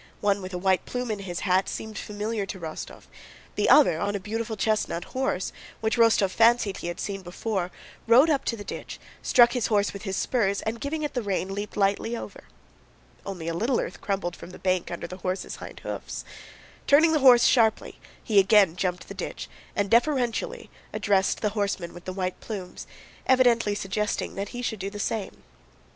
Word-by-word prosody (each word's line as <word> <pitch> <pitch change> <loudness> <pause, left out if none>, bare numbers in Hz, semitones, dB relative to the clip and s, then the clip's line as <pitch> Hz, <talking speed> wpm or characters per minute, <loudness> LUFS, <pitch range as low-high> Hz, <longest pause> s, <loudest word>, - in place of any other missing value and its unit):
One 200 -1 +1
with 185 0 -7
a 180 - -3
white 190 0 +1
plume 250 -2 -3
in 210 - -3
his 180 -3 -5
hat 190 0 +2
seemed 220 -1 -6
familiar 210 0 -3
to 190 - -6
Rostóv; 160 -2 -7 0.5
the - - +1
other 270 - +6
on 205 +3 -1
a - - -1
beautiful 220 +2 -4
chestnut 210 -4 0
horse 255 -8 -2 0.3
(which 220 +1 0
Rostóv 225 -5 +4
fancied 225 -3 +3
he - - -5
had 175 - -5
seen 195 -2 -4
before) 185 +1 -3 0.4
rode 245 +7 +7
up 280 - +1
to 230 - -1
the 205 - -7
ditch, - - -7 0.2
struck 240 -1 +5
his 245 -4 0
horse 205 -2 +1
with 200 - -7
his 195 -2 -3
spurs, 200 -6 0
and 225 +1 -3
giving 305 +2 -2
it 295 - -2
the 245 - -1
rein 195 -2 -2
leaped 205 +1 -5
lightly 205 +4 +1
over. - - -9 0.8
Only 180 -4 -5
a 165 - -1
little 230 +9 +1
earth - - -5
crumbled 195 -4 -2
from - - -11
the 185 - -11
bank 185 -1 0
under 170 -1 -5
the 180 +2 -7
horse's 185 0 -3
hind - - -10
hoofs. - - -6 0.6
Turning 315 +3 +6
the 310 - +3
horse 250 -3 +7
sharply, 225 -3 +2 0.2
he 210 -3 +4
again 195 -3 +5
jumped 180 -1 -2
the - - -7
ditch, - - -5 0.3
and 205 - +1
deferentially 260 - +1 0.2
addressed 195 -2 +1
the 210 - +1
horseman 200 -4 -2
with 175 - -12
the 185 - -4
white 185 -1 -3
plumes, 195 -5 -7 0.4
evidently 240 -5 +4
suggesting 210 +1 -2
that 200 +1 -4
he 245 0 -6
should 220 -4 -2
do 195 +1 -3
the 205 - -8
same. 205 0 -3
205 Hz, 195 wpm, -26 LUFS, 190-230 Hz, 0.8 s, rode